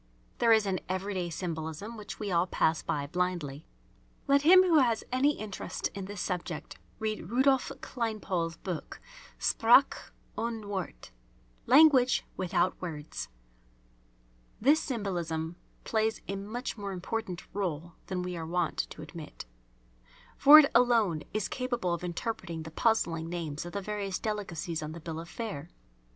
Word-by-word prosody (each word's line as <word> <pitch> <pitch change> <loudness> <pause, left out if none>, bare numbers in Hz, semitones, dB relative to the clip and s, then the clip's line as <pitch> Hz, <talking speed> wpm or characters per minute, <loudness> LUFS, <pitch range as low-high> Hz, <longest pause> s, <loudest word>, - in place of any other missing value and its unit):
There 230 - +4
is 220 -2 +5
an 190 -2 0
everyday 185 -1 -2
symbolism 165 +5 -5
which 210 -2 -8
we 205 -3 -3
all 170 +1 +2
pass 160 -2 +1
by 145 -1 -2
blindly. 165 -3 -2 0.6
Let 280 0 +5
him 370 +5 +8
who 335 -4 +5
has 235 -4 +2
any 280 +4 +2
interest 210 -3 -4
in 195 -1 -7
this 205 0 -7
subject 180 -4 -4 0.2
read 215 -5 -3
Rudolph 265 +2 +3
Kleinpaul's 200 -8 -2
book, 180 -5 -6 0.4
"Sprache 240 +4 +4 0.2
ohne 225 -2 -3
Worte" 190 - -5 0.6
(Language 265 -2 +6
without 185 0 +1
Words). 155 - -5 1.3
This 290 +7 +5
symbolism 175 - -3 0.3
plays 220 0 0
a 195 - -2
much 215 +4 -5
more 200 -1 -4
important 185 0 -4
rôle 175 -4 -3
than 180 -1 -2
we 180 0 -4
are 165 -1 -5
wont 175 -1 -1
to 155 - -9
admit. 155 - -9 0.9
For 290 +2 +10
it 300 -2 +7
alone 230 -9 +4
is 215 0 -1
capable 250 - -2
of 170 - -4
interpreting 175 -2 -4
the 160 - -9
puzzling 165 -6 +1
names 165 -2 -4
of 175 - -9
the 200 - -2
various 200 -2 -3
delicacies 180 -6 -3
on 155 0 -5
the 170 - -8
bill 160 -1 -6
of 170 +1 -8
fare. 195 -9 -5
190 Hz, 145 wpm, -30 LUFS, 170-225 Hz, 1.3 s, For